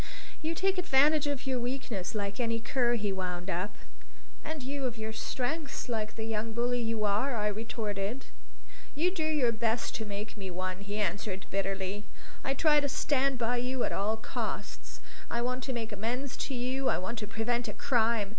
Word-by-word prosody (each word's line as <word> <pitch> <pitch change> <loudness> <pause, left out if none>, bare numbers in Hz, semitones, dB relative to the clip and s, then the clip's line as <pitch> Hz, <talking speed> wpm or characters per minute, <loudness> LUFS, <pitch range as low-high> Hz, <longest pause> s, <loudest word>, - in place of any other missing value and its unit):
"You 320 +2 0
take 380 +1 +2
advantage 300 -2 +5
of 285 -2 -1
your 260 -2 +1
weakness, 240 -6 -2
like 200 0 -2
any 230 -1 +1
cur," 240 +1 +2
he 210 -3 0
wound 180 -1 -2
up. 180 +4 -1 0.7
"And 310 -3 -4
you 275 +1 -2
of 240 -2 -1
your 220 0 -3
strength 275 +6 -2
like 215 -3 -1
the 225 - -3
young 220 0 -1
bully 240 +1 +1
you 225 -2 0
are!" 215 +6 +2
I 210 -2 0
retorted. 215 +1 -2 0.7
"You 340 +5 +3
do 350 -4 -1
your 300 -6 +3
best 230 +1 0
to 220 - -3
make 210 +1 -5
me 195 -2 -4
one," 185 +1 -2
he 200 +1 -4
answered 200 -1 -1
bitterly. 195 +1 -1 0.4
"I 270 - +1
try 300 0 +6
to 285 -1 0
stand 275 -1 +2
by 240 +1 +1
you 250 +1 0
at - - +1
all 215 +3 +1
costs. 220 - -4 0.3
I 235 0 0
want 255 +1 -1
to 265 - -1
make 230 -3 -3
amends 240 +6 -2
to 270 - -2
you, 260 +2 +1
I - - +3
want 215 +5 -3
to 210 - -3
prevent 235 +2 0
a - - -1
crime. 225 -4 +2
230 Hz, 190 wpm, -31 LUFS, 210-265 Hz, 0.7 s, try